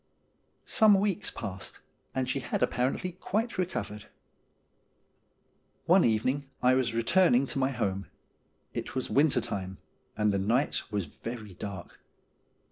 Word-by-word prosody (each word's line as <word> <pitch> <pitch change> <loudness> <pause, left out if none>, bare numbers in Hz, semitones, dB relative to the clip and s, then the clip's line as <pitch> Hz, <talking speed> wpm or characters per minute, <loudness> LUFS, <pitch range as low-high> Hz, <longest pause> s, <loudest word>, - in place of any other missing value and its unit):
Some 210 -3 +6
weeks 200 0 +1
passed, 95 0 -6 0.4
and 130 -1 0
she 135 - 0
had 125 - -1
apparently 130 +9 0
quite 205 +4 -2
recovered. 105 - -3 1.8
One 180 +2 +6
evening 130 +5 +1
I 125 0 +4
was 130 -3 +1
returning 125 +2 +4
to 135 - -3
my 130 0 +2
home. 100 -7 -2 0.7
It - - -5
was 130 - -2
winter 140 -3 +4
time, 95 -5 -4 0.4
and 105 -1 +2
the 100 - +1
night 115 +9 +1
was 100 -3 -1
very 110 +6 -8
dark. 95 -1 -8
125 Hz, 125 wpm, -29 LUFS, 105-150 Hz, 1.8 s, Some